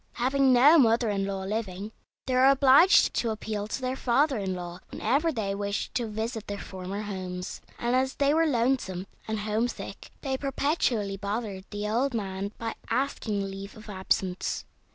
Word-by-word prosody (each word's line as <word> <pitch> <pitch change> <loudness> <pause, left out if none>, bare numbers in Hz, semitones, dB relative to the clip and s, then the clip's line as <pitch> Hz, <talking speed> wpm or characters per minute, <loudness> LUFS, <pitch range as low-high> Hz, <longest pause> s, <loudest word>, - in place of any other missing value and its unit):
Having 265 +2 +2
no 280 +7 +7
mother 230 -3 +4
in 195 -1 -1
law 195 -1 -3
living, 205 0 -3 0.3
they 260 - -1
were 255 +1 +6
obliged 275 +6 +6
to 235 - 0
appeal 215 -1 -3
to 220 - -3
their 255 0 -1
father 265 +1 +2
in 190 -2 -2
law 175 0 -6
whenever 310 +5 +1
they 215 -7 -2
wished 200 0 -3
to 240 -2 -1
visit 220 +1 -4
their 205 - -4
former 190 +1 -6
homes, 185 -2 -5 0.2
and 240 +1 0
as 260 +1 +1
they 285 0 +3
were 325 +1 +3
lonesome 235 - 0 0.2
and 220 -1 -2
homesick 220 +3 -3
they 265 -2 -1
perpetually 260 -7 0
bothered 200 -1 -4
the 205 0 -3
old 245 +4 0
man 195 -1 -3
by 225 -1 -3 0.2
asking 225 -6 -1
leave 195 +2 -8
of 215 0 -10
absence. 190 -1 -1
220 Hz, 170 wpm, -28 LUFS, 200-260 Hz, 0.3 s, no